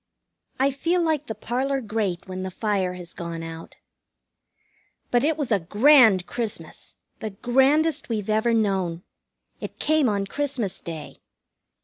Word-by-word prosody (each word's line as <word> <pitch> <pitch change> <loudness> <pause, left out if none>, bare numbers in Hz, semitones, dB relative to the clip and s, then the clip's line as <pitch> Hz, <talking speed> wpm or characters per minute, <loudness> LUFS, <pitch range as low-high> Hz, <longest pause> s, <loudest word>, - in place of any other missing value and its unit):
I 275 +1 +3
feel 335 +6 0
like 310 -3 0
the 220 - -4
parlor 270 +3 -1
grate 210 -6 -2
when 185 0 -5
the 190 - -3
fire 190 -1 -1
has 180 -1 -9
gone 170 -1 -5
out. 165 0 -8 1.4
But 245 0 +3
it 310 +1 +2
was 285 -6 -2
a 205 - +4
grand 215 - +5
Christmas, 210 -9 -5 0.2
the 220 - -4
grandest 270 +9 +2
we've 215 -4 -2
ever 220 +2 +2
known. 190 -6 0 0.6
It - - -7
came 310 -4 +2
on 200 -1 0
Christmas 250 -5 -2
Day. 160 -3 -8
220 Hz, 140 wpm, -24 LUFS, 185-270 Hz, 1.4 s, grand